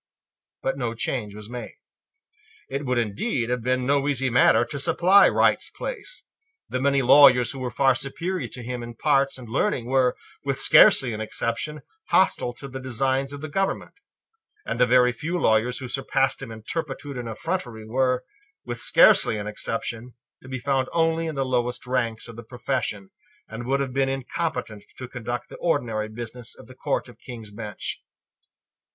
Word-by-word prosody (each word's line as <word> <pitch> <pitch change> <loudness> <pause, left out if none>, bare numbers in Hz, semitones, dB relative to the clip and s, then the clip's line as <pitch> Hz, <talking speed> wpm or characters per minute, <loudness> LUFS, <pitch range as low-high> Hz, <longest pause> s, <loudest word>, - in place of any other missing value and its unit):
But 135 +1 -1
no 120 -2 -2
change 110 -3 -3
was 105 0 -9
made. 120 -1 -7 1.0
It 140 0 -3
would 125 0 +1
indeed 120 - -1
have 125 -1 -1
been 130 +1 0
no 140 +1 +2
easy 135 -3 0
matter 120 -1 +5
to 140 +4 -6
supply 185 +8 +5
Wright's - - +2
place. - - -6 0.4
The 130 - -3
many 140 0 +2
lawyers 125 -2 +7
who 135 - -8
were 130 -1 -2
far 135 +3 +3
superior 170 +9 -3
to 125 - -9
him 125 +1 -4
in 120 0 -8
parts 140 +1 +2
and 125 -2 -10
learning 130 - 0
were, 130 0 +2 0.3
with 135 -1 -2
scarcely 130 -2 +6
an 110 - -4
exception, 115 +7 -3 0.3
hostile 185 -9 +3
to 140 +3 -9
the 130 0 -7
designs 130 +2 -1
of 145 0 -7
the 155 - -4
government; 195 +6 -2 0.7
and - - -3
the 125 - +5
very 125 0 +5
few 160 +9 -3
lawyers 115 -3 +2
who 130 - -6
surpassed 135 +1 0
him 135 - -7
in 110 -1 -10
turpitude 145 -1 -4
and 120 -2 -5
effrontery 120 - -4
were, 125 +2 0 0.4
with 120 -1 -5
scarcely - - +5
an 105 - -4
exception, 115 +3 -5 0.3
to - - -14
be 130 - -3
found 130 0 0
only 165 0 +1
in 160 - -4
the 135 -1 0
lowest 125 -1 -1
ranks 120 -3 -1
of 115 - -10
the 115 - -8
profession, 115 -5 -3 0.4
and 115 +2 -7
would 135 +1 +1
have 135 -2 -2
been 135 0 +1
incompetent 130 -5 -3
to 130 - -6
conduct 120 -1 -5
the - - -10
ordinary 115 -10 -1
business 120 +2 -8
of - - -13
the 130 - -13
Court 135 +1 -2
of 120 -2 -15
King's 115 -5 -10
Bench. 105 -1 -6
125 Hz, 180 wpm, -24 LUFS, 120-140 Hz, 1.0 s, lawyers